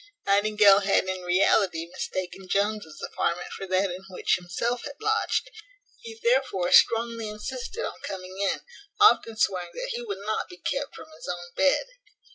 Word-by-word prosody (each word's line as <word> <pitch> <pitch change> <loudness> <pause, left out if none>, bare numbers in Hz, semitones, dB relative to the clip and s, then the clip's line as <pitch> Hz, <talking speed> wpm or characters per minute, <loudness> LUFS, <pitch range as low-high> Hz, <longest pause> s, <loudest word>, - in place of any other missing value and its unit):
Nightingale 205 0 +5
had 200 0 +2
in 185 0 -3
reality 180 -1 +2
mistaken 185 +2 -5
Jones's 200 -6 -1
apartment 175 +1 -2
for 195 - -6
that 185 +1 +1
in 180 +2 -7
which 185 - +1
himself 205 +7 -2
had 285 -1 -8
lodged; 440 +3 0 0.5
he 460 -1 -10
therefore 330 - +2
strongly 230 -1 +4
insisted 465 - -5
on - - -7
coming 185 -1 -7
in, 200 - 0 0.4
often 320 - +5
swearing 180 -4 0
that - - -4
he 475 +1 -3
would 445 -4 -5
not 215 - -2
be 180 - -11
kept 275 +9 -3
from - - -10
his - - -11
own 175 0 -8
bed. 285 - +3
200 Hz, 160 wpm, -26 LUFS, 185-260 Hz, 0.5 s, Nightingale